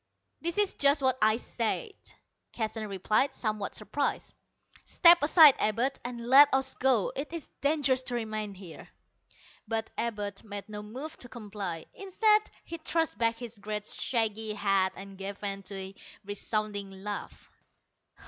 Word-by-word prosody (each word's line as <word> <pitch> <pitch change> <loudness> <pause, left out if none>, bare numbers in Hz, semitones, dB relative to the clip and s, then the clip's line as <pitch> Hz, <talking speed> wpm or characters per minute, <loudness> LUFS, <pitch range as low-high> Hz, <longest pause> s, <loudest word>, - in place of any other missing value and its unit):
"That 340 +2 -2
is 415 -2 +2
just 280 0 +3
what 260 -1 +3
I 215 +1 +4
said," 245 - -2 0.6
Keston 220 -1 -3
replied, 205 +7 0
somewhat 215 -3 -3
surprised. 280 +7 -2 0.5
"Step 345 0 +6
aside, 300 -1 +8
Abud, 240 +6 0
and 240 -1 -6
let 280 +3 +8
us 265 0 +1
go. 255 -6 +2
It 280 +3 -4
is 335 -3 -6
dangerous 280 -3 +2
to 245 - -3
remain 215 -3 -4
here." 180 -4 -12 0.8
But 225 0 -2
Abud 205 -4 -3
made 205 -2 -7
no 210 -1 -7
move 255 +9 -7
to 245 - -9
comply. 200 -8 -6
Instead 425 +2 +3 0.2
he 335 - -7
thrust 325 -2 -1
back 230 0 +2
his 230 -2 -9
great 210 +1 -4
shaggy 220 -3 -1
head 195 -2 +1
and 195 0 -10
gave 195 +1 -5
vent 195 -1 -4
to 200 - -6
a 190 0 -7 0.3
resounding 205 0 -3
laugh. 195 +2 -7
220 Hz, 150 wpm, -29 LUFS, 205-270 Hz, 0.8 s, aside